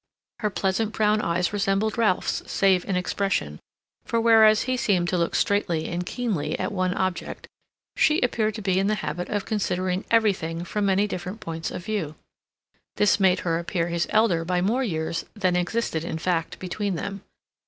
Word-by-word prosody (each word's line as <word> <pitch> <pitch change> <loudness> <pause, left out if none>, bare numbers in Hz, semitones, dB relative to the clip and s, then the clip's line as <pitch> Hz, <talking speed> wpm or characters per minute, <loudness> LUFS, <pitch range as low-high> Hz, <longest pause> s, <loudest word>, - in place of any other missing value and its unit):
Her 215 -2 0
pleasant 205 +3 -1
brown 215 0 +2
eyes 175 +2 0
resembled 205 +1 0
Ralph's, 220 -6 +1
save 190 -2 +3
in 195 - -1
expression, 180 - -1 0.4
for 230 - -1
whereas 220 -1 +6
he 255 0 -1
seemed 190 -8 +1
to 180 - 0
look 170 - 0
straightly 175 -6 +1
and 175 +1 -2
keenly 180 - -2
at - - -2
one 185 -2 0
object, 185 -2 -3 0.5
she 305 +2 +3
appeared 220 -3 0
to 215 - -6
be 190 -1 +2
in 195 - +1
the 215 - +2
habit 170 +4 -4
of 205 -2 -2
considering 185 -3 -1
everything 190 -7 +1
from 205 +3 -1
many 195 +1 +3
different 190 +1 -5
points 165 -3 -4
of 180 - -7
view. 185 -9 -3 0.8
This 210 0 +3
made 190 -1 +3
her 165 -1 0
appear 170 0 -2
his 170 0 -1
elder 215 -7 +3
by 180 +1 0
more 225 +9 +1
years 165 -5 -2
than 185 -4 +1
existed 180 -2 -1
in 165 - -3
fact 165 0 -1
between 195 +1 -3
them. 195 +3 -5
190 Hz, 175 wpm, -25 LUFS, 175-215 Hz, 0.8 s, whereas